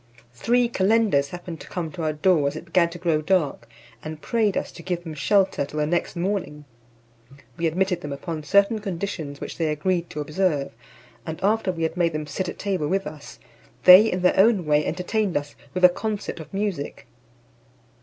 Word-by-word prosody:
Three 240 - +2
calenders 200 -9 +2
happened 175 -1 -8
to - - -11
come 170 -3 -4
to 175 - -7
our 155 -1 0
door 155 -1 +2
as 140 - -3
it 160 - -7
began 170 -1 +2
to 170 - -9
grow 165 -3 0
dark, 150 -9 0 0.3
and 155 0 -6
prayed 220 +1 0
us - - -3
to 170 - -11
give 175 0 -3
them 160 -2 -7
shelter 190 +2 +2
till 150 +2 -5
the 150 - +2
next 170 +3 -1
morning 170 -5 -3 0.9
We 165 -1 0
admitted 180 +2 0
them 145 - -6
upon 155 +3 -5
certain 200 +8 +3
conditions 175 -7 -5
which - - -7
they 165 - +1
agreed 170 +3 -1
to 150 - -6
observe; 150 -1 0 0.5
and 160 +5 -6
after 210 -1 +2
we 165 -2 -4
had 160 +2 -2
made 170 -2 +2
them 155 0 -3
sit 185 +4 -3
at - - -7
table 190 -7 -1
with 195 +4 0
us, 150 -1 -9 0.5
they 190 +5 +9
in 180 0 -2
their 180 - +3
own 200 -3 +4
way 150 0 +3
entertained 190 +1 -1
us 145 0 -5 0.2
with 185 0 +5
a - - +12
concert 205 0 -4
of 155 -2 -10
music. 195 -7 -3
175 Hz, 195 wpm, -24 LUFS, 155-195 Hz, 0.9 s, a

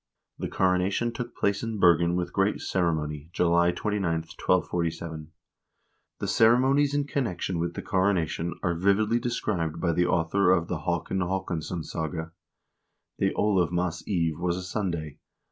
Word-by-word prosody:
The - - -2
coronation 95 +5 +1
took 120 +1 -6
place 100 0 +1
in 115 -2 -3
Bergen 85 -2 +4
with 90 0 -2
great 95 +2 +1
ceremony 80 -4 -1
July 85 0 +3
29, 90 -2 -1
1247.2 80 -2 -2 0.9
The - - -4
cere 115 +2 +5
monies 140 +2 +2
in 145 - +2
connection 95 -11 -2
with 85 +1 -2
the - - -5
coronation 90 -3 0
are 90 -2 +1
vividly 100 +6 +2
described 90 - -2
by 85 -1 +1
the 90 +2 +2
author 90 +3 +2
of 85 -2 +3
the 85 - -2
"Haakon 85 +3 -2
Haakonssonssaga": 85 -2 -3 0.9
"The - - +2
Olavmas 90 -4 +1
eve 85 -5 0
was 90 0 0
a 90 - -5
Sunday. 90 -6 -3
90 Hz, 140 wpm, -27 LUFS, 85-100 Hz, 0.9 s, cere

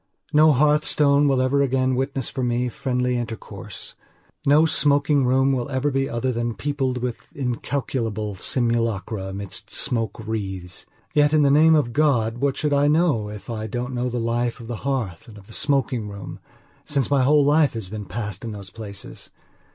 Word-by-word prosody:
No 155 +1 +6
hearthstone 145 0 +3
will 135 -2 +2
ever 140 +2 +2
again 130 -1 +1
witness, 135 0 -2
for 130 - -4
me, 125 0 0
friendly 125 0 -1
intercourse. 115 -3 -7 0.5
No 150 +3 +6
smoking 145 -3 +2
room 135 +2 +3
will 130 -1 -1
ever 135 +2 0
be 135 0 0
other 120 +3 -1
than 120 -1 -2
peopled 135 -3 -1
with 125 -2 -3 0.2
incalculable 120 -5 -2
simulacra 115 -2 -1
amidst 100 0 -6
smoke 115 -1 -1
wreaths. 95 -5 -5 0.3
Yet, 145 0 +4
in 155 -1 +5
the 140 - +4
name 160 +2 +6
of 135 -6 +1
God, 120 -6 +2
what 140 0 0
should 150 -1 0
I 140 +1 +3
know 150 -9 +2
if 105 -1 -9
I 110 -2 -4
don't 125 +4 -4
know 125 0 -1
the 120 - -3
life 120 +1 -1
of 115 - -9
the 115 0 -5
hearth 125 -11 -3
and 110 -3 -12
of 100 - -14
the 110 - -11
smoking 135 -6 0
room, 100 0 -8 0.4
since 140 -2 -1
my 140 -2 +4
whole 145 +2 +4
life 150 0 +4
has 110 -5 -6
been 105 +1 -6
passed 105 +1 -5
in 115 -2 -5
those 100 -3 -8
places? 100 -3 -9
125 Hz, 180 wpm, -23 LUFS, 110-140 Hz, 0.5 s, No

